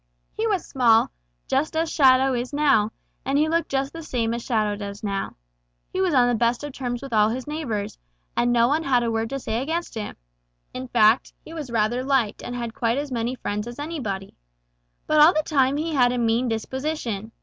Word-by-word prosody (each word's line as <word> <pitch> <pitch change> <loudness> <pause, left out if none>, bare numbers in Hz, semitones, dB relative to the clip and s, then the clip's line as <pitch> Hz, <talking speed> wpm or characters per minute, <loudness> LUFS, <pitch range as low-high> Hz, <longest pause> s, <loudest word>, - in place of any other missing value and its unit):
He 450 - -1
was 400 -5 0
small, 235 -4 +3 0.4
just 300 +4 0
as 325 0 0
Shadow 265 -2 +5
is 245 +1 -2
now, 275 -8 +3 0.3
and 275 +1 0
he 305 +2 +3
looked 335 +1 0
just 275 0 -1
the 330 - -7
same 235 -7 -1
as 235 0 -4
Shadow 215 -3 0
does 205 0 -7
now. 200 -2 -3 0.6
He 375 - 0
was 375 -2 +2
on 250 -4 +4
the 245 - +2
best 235 +3 +1
of 290 -2 -6
terms 245 -1 -4
with 270 -3 -7
all 210 0 +4
his 250 +3 -4
neighbors, 250 - -4 0.4
and 240 0 +2
no 235 -1 +4
one 300 +5 +1
had 255 -5 +2
a 230 - 0
word 225 0 -1
to 275 - -3
say 225 -1 -2
against 330 +5 -3
him. 220 -3 -5 0.6
In 255 +1 -5
fact, 225 0 +3
he 320 - -10
was 305 -5 -6
rather 235 +2 0
liked 260 -6 +1
and 245 - -6
had 235 -2 -4
quite 235 +1 0
as 285 -1 -3
many 240 +1 -1
friends 210 -2 -4
as 240 +1 -8
anybody. 255 -12 -4 0.7
But 305 -1 +4
all 310 +3 +7
the 310 - +2
time 275 -3 +2
he 320 +2 -2
had 250 -4 +4
a 250 - -1
mean 235 +1 +1
disposition. 230 -2 -3
250 Hz, 215 wpm, -24 LUFS, 225-290 Hz, 0.7 s, all